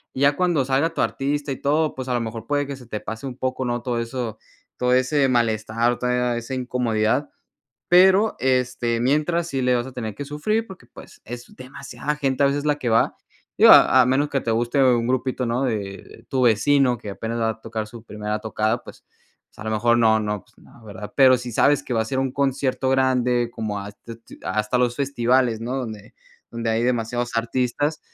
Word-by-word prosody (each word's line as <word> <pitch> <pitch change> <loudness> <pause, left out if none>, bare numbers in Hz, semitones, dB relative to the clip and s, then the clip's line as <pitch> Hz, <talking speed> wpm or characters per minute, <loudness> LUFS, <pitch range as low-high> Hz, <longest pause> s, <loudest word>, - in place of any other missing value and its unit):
ya 140 +2 +3
cuando 175 -7 +1
salga 140 +5 +1
tu - - -1
artista 140 +1 -1
y 135 - -3
todo, 150 +2 +1
pues, 130 0 -6
a 125 - -1
lo 120 - +1
mejor 115 0 -6
puede 145 0 0
que 140 0 -6
se 125 -3 -14
te 105 -2 -4
pase 110 +4 -6
un 125 -1 -7
poco, 130 0 -2
no 120 0 -2
todo 120 -2 -1
eso, 115 -1 -4 0.4
todo 125 0 +1
ese 135 +2 +2
malestar, 115 0 +1
toda 125 -1 0
esa 120 +3 -5
incomodidad. 125 +1 0 0.6
Pero 190 +4 +5
este 125 -2 0
mientras 155 +6 +1
sí 135 -3 -2
le 125 0 +2
vas 120 +1 -2
a 130 - -9
tener 110 -4 -5
que 145 - -5
sufrir, 215 +11 -1
porque 190 -1 -13
pues, - - -15
es 120 +1 -8
demasiada 140 +3 -6
gente 140 -1 0
a - - +6
veces 145 +1 -1
la 150 -1 +2
que 125 - -3
va, 115 0 +2 0.4
digo - - +8
a 130 - +7
a 125 - +1
menos 135 +3 +1
que 140 -1 -1
te 115 - -3
guste 120 +4 +1
un 120 -2 +3
grupito, 130 0 -1
¿no?, 120 +3 0
de 120 -4 0 0.3
de - - -16
tu 130 -1 0
vecino, 125 +3 +3
que 105 - -7
apenas 115 +3 -4
va 115 - +1
a 110 0 -8
tocar 110 -1 -5
su 115 0 -11
primera 105 0 -4
tocada, 110 +1 -1
pues - - -14 0.4
pues - - -27
a 110 - -8
lo 110 - -2
mejor 120 +2 +2
no, 110 -1 +4
no, 105 -2 -3
pues - - -30
no, 115 - -19
¿verdad? 105 0 -9
Pero 130 -2 +7
si 125 0 -6
sabes 140 +5 +3
que 125 - -6
va 115 - +2
a - - -5
ser 130 +3 -2
un 135 -1 -1
concierto 135 -1 -1
grande 125 -2 +2
como 110 -3 -4
has 100 +1 -10
te 115 - -8
tu 115 - -16
hasta 110 +5 0
los 120 -1 +1
festivales, 125 -4 +1
no 120 +3 -4
donde 110 -6 -6 0.4
donde 115 -1 -2
hay 115 +2 +1
demasiados 120 0 -1
artistas. 125 +6 -1
125 Hz, 215 wpm, -22 LUFS, 115-135 Hz, 0.6 s, digo